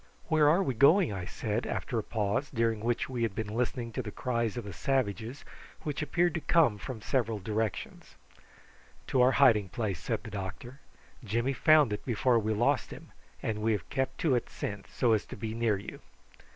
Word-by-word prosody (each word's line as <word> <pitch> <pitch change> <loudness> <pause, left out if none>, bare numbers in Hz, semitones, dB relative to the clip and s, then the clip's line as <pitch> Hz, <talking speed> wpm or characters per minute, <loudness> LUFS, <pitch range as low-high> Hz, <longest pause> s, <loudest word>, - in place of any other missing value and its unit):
"Where 155 -2 +5
are 175 +6 +4
we 135 - -1
going?" 145 - +5
I 90 -2 -4
said, 110 +5 -3
after 120 - -2
a - - -3
pause, 105 +6 -1
during 115 -3 0
which 115 +2 -1
we 125 -2 -4
had 115 -4 0
been 105 -1 -4
listening 120 0 -2
to 130 - -3
the 110 - -6
cries 115 0 -2
of 120 - -3
the 100 -2 -7
savages, 120 - -2 0.4
which 150 -1 -3
appeared 170 +3 +1
to 160 - -2
come 145 -8 +3
from 115 -1 -7
several 115 -4 0
directions. 105 +1 -4 0.9
"To 130 - +3
our 130 +1 +5
hiding 110 -8 +5
place," 100 -2 -3
said 110 +4 -3
the 110 - -8
doctor. 105 +7 -6 0.4
"Jimmy 120 +5 0
found 150 -4 +5
it 105 - -5
before 120 0 +2
we 110 0 -1
lost 110 +3 +1
him, - - -11 0.3
and 105 -1 -2
we 110 +1 +2
have 105 - -3
kept 135 -3 -1
to 155 -5 +3
it 120 - 0
since, 100 -1 -6
so 120 -3 +2
as 110 - +1
to - - -8
be 110 +2 -4
near 115 -3 +1
you." 100 - -9
115 Hz, 200 wpm, -30 LUFS, 105-130 Hz, 0.9 s, Where